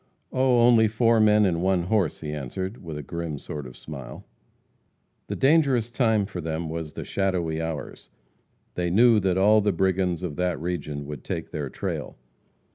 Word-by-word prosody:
"Oh, 130 -2 +3
only 115 -2 +6
four 115 +1 +3
men 105 -1 +5
and 85 -3 0
one 95 -1 +2
horse," 95 -2 0
he 75 -1 -4
answered, 95 - -5
with 80 -3 -6
a 75 - -6
grim 85 +1 -5
sort 75 -1 -7
of 60 - -12
smile. 65 -5 -9 1.0
The - - -3
dangerous 135 -5 +3
time 110 -5 +2
for 95 -3 -6
them 80 0 -3
was 80 -1 -5
the - - -6
shadowy 90 -5 -1
hours. 80 -3 -6 0.6
They 90 -1 -1
knew 115 +4 +5
that 95 -2 +1
all 105 +3 +5
the 105 0 +2
brigands 95 -1 0
of 80 -5 -4
that 90 -2 0
region 75 -4 -4
would 75 -3 -7
take - - -5
their 75 -3 -4
trail. - - -5
90 Hz, 175 wpm, -25 LUFS, 80-110 Hz, 1.0 s, only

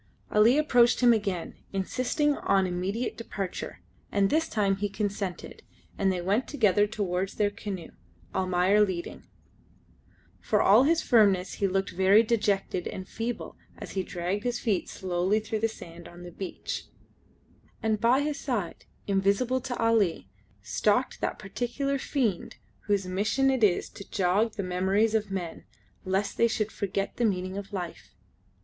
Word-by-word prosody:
Ali 220 +6 +5
approached 245 -6 +4
him 240 -1 +7
again, 200 -6 -2 0.2
insisting 255 +9 0
on 195 -7 +2
immediate 190 +7 -2
departure, 200 -5 -5 0.3
and 200 -1 +2
this 320 +1 +1
time 200 -3 +1
he 205 +1 -2
consented, 200 -2 -4 0.3
and 195 -1 +1
they 180 -1 -2
went 200 +8 0
together 210 -7 +3
towards 195 -3 -2
their 205 -1 +1
canoe, 195 -5 -6 0.4
Almayer 185 +2 +3
leading. 185 -4 -4 1.1
For 210 - +1
all 215 +8 +6
his 330 +2 +2
firmness 200 -6 +3
he 200 - +4
looked 195 +1 -1
very 190 +4 +5
dejected 205 -5 0
and 185 0 -6
feeble 230 +1 -5 0.2
as - - -8
he 190 - -1
dragged 180 +3 -3
his 245 -1 -1
feet 210 -7 -1
slowly 185 +3 0
through 220 0 -3
the 225 - +2
sand 170 -6 -11
on 175 +1 -12
the 175 - -9
beach; 185 +2 -6 1.0
and 215 -2 0
by 245 +4 +4
his 290 -1 -2
side 215 -11 -3 0.2
invisible 200 +6 +1
to 250 -1 -4
Ali 225 -6 +1 0.3
stalked - - 0
that - - -1
particular 275 +3 -2
fiend 240 - -1 0.3
whose 200 -2 +1
mission 215 +9 +1
it 260 -4 0
is 190 -4 +3
to 200 - -12
jog 200 +4 +1
the 200 - -4
memories 190 +4 +1
of 215 -2 0
men, 180 -4 -5 0.4
lest 190 +2 -1
they 235 - +5
should 220 -1 -1
forget 200 -1 -3
the 245 - 0
meaning 185 -2 -1
of 200 +1 -6
life. 180 -4 -6
205 Hz, 155 wpm, -28 LUFS, 190-230 Hz, 1.1 s, him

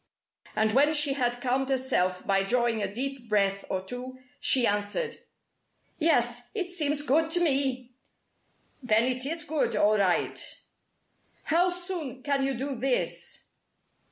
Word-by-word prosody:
And 220 0 +2
when 290 +6 +4
she 290 -2 +3
had 245 -3 -1
calmed 260 +2 0
herself 250 -9 0
by 195 0 +2
drawing 235 +2 +1
a 195 -1 -2
deep 255 +1 -5
breath 200 -2 +1
or 185 -1 -2
two, 250 +4 -5 0.2
she 255 -3 +3
answered: 205 - -1 0.8
"Yes, 245 -6 +1
it 365 -4 -2
seems 295 -4 -1
good 315 +3 +2
to 350 +2 +3
me!" 265 -6 0 0.9
"Then 225 -3 +3
it 255 +1 -1
is 330 +1 -3
good, 300 0 -1
all 210 +1 +3
right!" 185 -3 +1 1.0
"How 345 +3 +3
soon 350 -8 -5
can 280 -2 +1
you 270 0 0
do 270 +3 -3
this?" 255 +1 -2
260 Hz, 140 wpm, -28 LUFS, 230-290 Hz, 1.0 s, when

